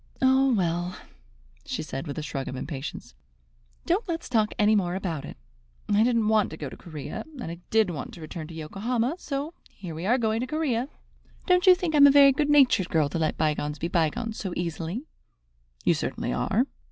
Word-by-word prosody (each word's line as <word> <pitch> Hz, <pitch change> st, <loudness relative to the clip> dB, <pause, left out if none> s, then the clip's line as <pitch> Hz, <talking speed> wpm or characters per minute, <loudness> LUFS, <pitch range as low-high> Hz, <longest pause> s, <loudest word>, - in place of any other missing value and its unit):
"Oh, 265 Hz, 0 st, +4 dB
well," 175 Hz, -3 st, 0 dB, 0.7 s
she -, -, -4 dB
said, 135 Hz, +5 st, -5 dB
with 145 Hz, -, -5 dB
a 155 Hz, -, -3 dB
shrug 135 Hz, -3 st, -4 dB
of 130 Hz, -, -5 dB
impatience, 135 Hz, -, -6 dB, 0.7 s
"don't 370 Hz, +6 st, 0 dB
let's 335 Hz, -1 st, -3 dB
talk 220 Hz, -4 st, +2 dB
any 210 Hz, +1 st, +4 dB
more 180 Hz, -3 st, 0 dB
about 170 Hz, -7 st, -3 dB
it. -, -, -9 dB, 0.5 s
I 210 Hz, 0 st, +3 dB
didn't 230 Hz, -2 st, +2 dB
want 215 Hz, -2 st, +3 dB
to 160 Hz, -, -8 dB
go 145 Hz, -4 st, -5 dB
to -, -, -10 dB
Corea, 155 Hz, -5 st, -7 dB, 0.2 s
and -, -, -5 dB
I 170 Hz, -, -8 dB
did 220 Hz, -4 st, +3 dB
want 150 Hz, -5 st, -6 dB
to 170 Hz, -, -12 dB
return 155 Hz, 0 st, -7 dB
to 165 Hz, -, -10 dB
Yokohama; 225 Hz, -, -2 dB
so 285 Hz, +2 st, -4 dB, 0.2 s
here 180 Hz, -5 st, -9 dB
we 165 Hz, +4 st, -4 dB
are 245 Hz, +4 st, +4 dB
going 220 Hz, -2 st, 0 dB
to 250 Hz, -, -2 dB
Corea. 270 Hz, -4 st, -1 dB, 0.6 s
Don't 360 Hz, 0 st, +3 dB
you 365 Hz, -, +9 dB
think 355 Hz, -3 st, -2 dB
I -, -, +3 dB
am 285 Hz, 0 st, +9 dB
a -, -, +7 dB
very 280 Hz, 0 st, +8 dB
good 290 Hz, +2 st, 0 dB
natured 260 Hz, -10 st, +5 dB
girl 155 Hz, -4 st, +2 dB
to 165 Hz, -, -3 dB
let 155 Hz, -1 st, 0 dB
bygones 150 Hz, -1 st, -1 dB
be 165 Hz, +4 st, -3 dB
bygones 175 Hz, +7 st, 0 dB
so 190 Hz, -4 st, -4 dB
easily?" 175 Hz, -, -3 dB, 0.8 s
"You -, -, +5 dB
certainly -, -, -3 dB
are." 215 Hz, -, +1 dB
210 Hz, 205 wpm, -26 LUFS, 160-260 Hz, 0.8 s, you